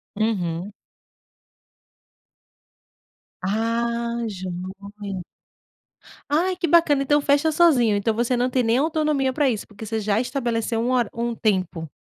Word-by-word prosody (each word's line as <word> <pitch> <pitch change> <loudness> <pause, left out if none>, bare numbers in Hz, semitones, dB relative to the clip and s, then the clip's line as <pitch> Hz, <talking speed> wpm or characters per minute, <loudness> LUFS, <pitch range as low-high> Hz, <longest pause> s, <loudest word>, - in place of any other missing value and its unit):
Uhum. 195 -4 -1 2.7
Ah, 235 +3 -1
joia. 195 +1 -6 1.1
Ai, 355 +5 +1
que 350 - -1
bacana. 300 -4 +4
Então 290 +2 +3
fecha 290 +3 +3
sozinho. 275 -10 +4
Então 205 +2 +1
você 235 +3 0
não 245 +1 +1
tem 255 0 +1
nem 230 +1 +2
autonomia 300 -2 +1
para 285 0 +2
isso, 220 -4 -2
porque 210 +1 -10
você 220 +1 -2
já 210 0 +1
estabeleceu 240 -3 -1
um 240 - 0
hora 245 -4 +2
um 235 0 -2
tempo. 185 -7 -1
235 Hz, 125 wpm, -23 LUFS, 205-275 Hz, 2.7 s, bacana